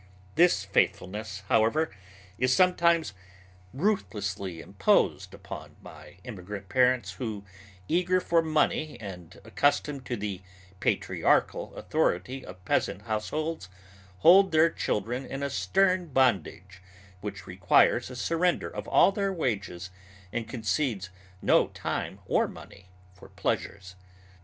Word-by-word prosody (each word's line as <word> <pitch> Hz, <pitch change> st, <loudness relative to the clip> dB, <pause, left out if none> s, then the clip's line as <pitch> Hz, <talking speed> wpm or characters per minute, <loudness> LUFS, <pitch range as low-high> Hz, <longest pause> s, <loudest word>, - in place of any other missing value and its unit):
This 170 Hz, -, +4 dB
faithfulness, 100 Hz, +1 st, -1 dB
however, 115 Hz, +6 st, +2 dB, 0.4 s
is 125 Hz, +1 st, +2 dB
sometimes 170 Hz, -, +3 dB, 0.6 s
ruthlessly 100 Hz, -, -2 dB
imposed -, -, +1 dB
upon -, -, -10 dB
by -, -, -13 dB
immigrant 100 Hz, -3 st, -8 dB
parents 125 Hz, +2 st, +2 dB
who, 110 Hz, -5 st, -5 dB, 0.4 s
eager 180 Hz, +2 st, +2 dB
for 170 Hz, -2 st, +2 dB
money 155 Hz, -1 st, 0 dB
and 90 Hz, -5 st, -9 dB
accustomed 140 Hz, +5 st, 0 dB
to 120 Hz, -, -2 dB
the 100 Hz, -2 st, -4 dB, 0.4 s
patriarchal -, -, +1 dB
authority 125 Hz, +10 st, -1 dB
of 90 Hz, 0 st, -12 dB
peasant 100 Hz, -, 0 dB
households, 115 Hz, -, -3 dB, 0.5 s
hold 190 Hz, +3 st, +7 dB
their 160 Hz, +1 st, +4 dB
children 120 Hz, +6 st, -2 dB
in 135 Hz, +1 st, -6 dB
a 140 Hz, -, -2 dB
stern 185 Hz, +3 st, +2 dB
bondage 100 Hz, -, 0 dB, 0.4 s
which 100 Hz, 0 st, -7 dB
requires 90 Hz, +5 st, +3 dB
a 125 Hz, -, -8 dB
surrender 165 Hz, +7 st, 0 dB
of -, -, -5 dB
all -, -, +5 dB
their 195 Hz, 0 st, -1 dB
wages 95 Hz, -, -3 dB, 0.4 s
and 115 Hz, -1 st, -3 dB
concedes 110 Hz, -3 st, -2 dB, 0.3 s
no -, -, +4 dB
time -, -, -4 dB
or -, -, +2 dB
money 90 Hz, -, -13 dB, 0.2 s
for -, -, -15 dB
pleasures. 95 Hz, -2 st, -3 dB
120 Hz, 115 wpm, -28 LUFS, 95-160 Hz, 0.6 s, hold